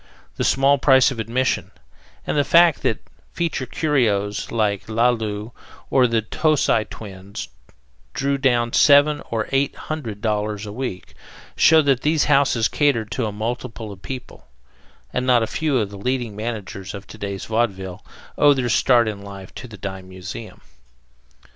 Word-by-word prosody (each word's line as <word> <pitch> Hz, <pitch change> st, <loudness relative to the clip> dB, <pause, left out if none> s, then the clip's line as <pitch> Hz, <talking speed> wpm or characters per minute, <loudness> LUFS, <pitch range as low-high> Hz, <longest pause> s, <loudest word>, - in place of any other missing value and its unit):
The -, -, -1 dB
small 140 Hz, +1 st, +3 dB
price 130 Hz, -1 st, +5 dB
of 125 Hz, -, -6 dB
admission, 120 Hz, +4 st, -1 dB, 0.6 s
and -, -, -2 dB
the 145 Hz, -, +3 dB
fact 170 Hz, +1 st, +5 dB
that 110 Hz, -, -1 dB, 0.3 s
feature 165 Hz, -6 st, -2 dB
curios 110 Hz, -10 st, 0 dB
like 105 Hz, -4 st, 0 dB
Laloo 110 Hz, -2 st, 0 dB, 0.4 s
or 130 Hz, -2 st, +5 dB
the 115 Hz, -2 st, 0 dB
Tocci 140 Hz, -3 st, +1 dB
Twins 95 Hz, -3 st, -8 dB, 0.7 s
drew 140 Hz, 0 st, 0 dB
down 120 Hz, -3 st, +1 dB
seven 145 Hz, +1 st, +5 dB
or 110 Hz, -2 st, -2 dB
eight 135 Hz, +1 st, +1 dB
hundred 125 Hz, -10 st, -6 dB
dollars 105 Hz, -1 st, -2 dB
a 105 Hz, -, -7 dB
week, 125 Hz, -6 st, -5 dB, 0.4 s
show 160 Hz, -1 st, +6 dB
that 135 Hz, -3 st, +2 dB
these 155 Hz, 0 st, +2 dB
houses 135 Hz, -6 st, +3 dB
catered 120 Hz, -8 st, +1 dB
to 115 Hz, 0 st, -1 dB
a -, -, -3 dB
multitude 115 Hz, +1 st, -5 dB
of 95 Hz, -1 st, -12 dB
people; 125 Hz, -, -8 dB, 0.7 s
and 125 Hz, 0 st, -1 dB
not 120 Hz, -2 st, +4 dB
a -, -, +1 dB
few 145 Hz, +5 st, -1 dB
of 105 Hz, -4 st, -1 dB
the 100 Hz, -, -9 dB
leading 125 Hz, -1 st, -2 dB
managers 105 Hz, -3 st, -5 dB
of 100 Hz, 0 st, -9 dB
to 110 Hz, -, -13 dB
day's 100 Hz, -2 st, -4 dB
vaudeville, 100 Hz, -5 st, -2 dB, 0.4 s
owe 145 Hz, -1 st, +6 dB
their 125 Hz, -2 st, -1 dB
start 120 Hz, 0 st, +4 dB
in 105 Hz, -2 st, -4 dB
life 100 Hz, -1 st, -10 dB
to -, -, -8 dB
the 110 Hz, -3 st, -11 dB
dime 95 Hz, -1 st, -7 dB
museum. 95 Hz, +4 st, -9 dB
115 Hz, 160 wpm, -22 LUFS, 105-135 Hz, 0.7 s, show